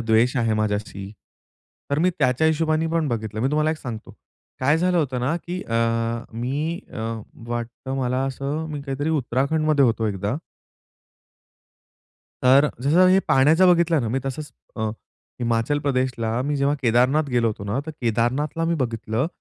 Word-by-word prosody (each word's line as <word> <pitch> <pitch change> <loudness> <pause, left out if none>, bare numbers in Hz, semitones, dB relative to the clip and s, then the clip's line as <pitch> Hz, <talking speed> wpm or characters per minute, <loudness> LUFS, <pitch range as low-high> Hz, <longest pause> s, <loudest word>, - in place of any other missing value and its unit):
द्वेष 115 +3 +2
आहे 115 -3 +1
माझ्याशी. 105 -2 -2 0.8
तर 140 - +1
मी 180 +3 +3
त्याच्या 130 +2 +2
हिशोबाने 160 0 +1
पण 165 -3 +1
बघितलं. 110 -3 -3
मी 130 - +2
तुम्हाला 155 +1 +2
एक 160 - -2
सांगतो, 115 -4 -7 0.5
काय 145 +5 +3
झालं 180 +1 +2
होतं 130 -6 -1
ना, 135 +7 0
की 180 +2 -5
अ, 115 - -5 0.6
मी 140 +9 -2
अ, - - -6 0.5
वाटतं 120 +3 -4
मला 125 -1 0
असं 140 +4 -3
मी 150 -1 -4
काहीतरी 140 +2 -2
उत्तराखंडमध्ये 145 +1 +1
होतो 115 -2 +1
एकदा 100 +3 -2 2.1
तर 130 +3 +6
अ, 150 - 0
जसं 165 +7 +5
हे 185 +1 +5
पाण्याचा 155 +7 +5
बघितला 170 -2 +4
ना 115 - -2
मी, 125 +4 0
तसंच 140 +3 -5 0.3
अ, 110 -1 -1 0.5
हिमाचल 115 +4 +1
प्रदेशला 130 -5 -1
मी 145 +1 -1
जेव्हा 140 +1 +2
केदारनाथ 130 +5 +3
गेलो 120 -2 +2
होतो 105 -2 -5
ना, 105 +5 -2
तर - - -4
केदारनाथला 125 +7 0
मी 170 +1 +1
बघितलं 115 +2 -2
135 Hz, 160 wpm, -23 LUFS, 115-155 Hz, 2.1 s, तर